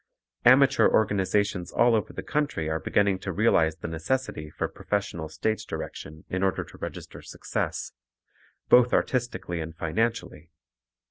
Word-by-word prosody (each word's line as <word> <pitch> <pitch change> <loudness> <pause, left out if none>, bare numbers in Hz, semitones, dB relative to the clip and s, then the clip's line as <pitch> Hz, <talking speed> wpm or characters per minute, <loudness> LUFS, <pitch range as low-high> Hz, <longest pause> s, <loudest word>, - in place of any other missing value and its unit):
Amateur 135 +2 +6
organizations 100 -3 +1
all 120 0 +4
over 110 -2 0
the - - -7
country 145 - -1
are 80 0 -1
beginning 100 0 +1
to 95 - -4
realize 85 -6 +3
the 85 - -6
necessity 80 - -3
for - - -3
professional 90 -6 -3
stage 110 +7 -2
direction 80 +1 -7
in 95 - -3
order 95 -1 +1
to - - -15
register - - -7
success, - - -4 0.8
both 125 0 +5
artistically 120 -9 -1
and 80 0 -7
financially. 90 -2 -2
95 Hz, 135 wpm, -26 LUFS, 80-115 Hz, 0.8 s, Amateur